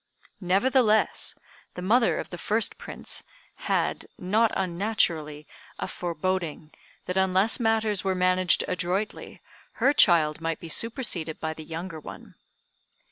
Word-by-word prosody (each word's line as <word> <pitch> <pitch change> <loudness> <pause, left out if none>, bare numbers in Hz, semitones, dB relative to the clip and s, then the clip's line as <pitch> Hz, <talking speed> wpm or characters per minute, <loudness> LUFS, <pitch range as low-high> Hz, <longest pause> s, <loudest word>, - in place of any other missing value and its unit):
Nevertheless, 215 +4 +2 0.4
the 180 - -6
mother 230 +5 +3
of - - -5
the 175 - -7
first 215 +4 0
prince - - -5 0.5
had, - - 0
not 215 +5 +2
unnaturally, 170 -5 -1 0.3
a - - -3
foreboding 170 -2 -3 0.3
that 180 - -3
unless 190 +4 +3
matters 220 -3 +1
were 190 -1 0
managed 185 0 +3
adroitly 185 +3 -3 0.3
her 270 +5 +3
child 165 - +4
might 165 -1 -2
be 165 - -9
superseded 215 - 0
by 160 0 -3
the 160 - -10
younger 165 +1 -6
one. - - -11
185 Hz, 125 wpm, -26 LUFS, 165-215 Hz, 0.5 s, child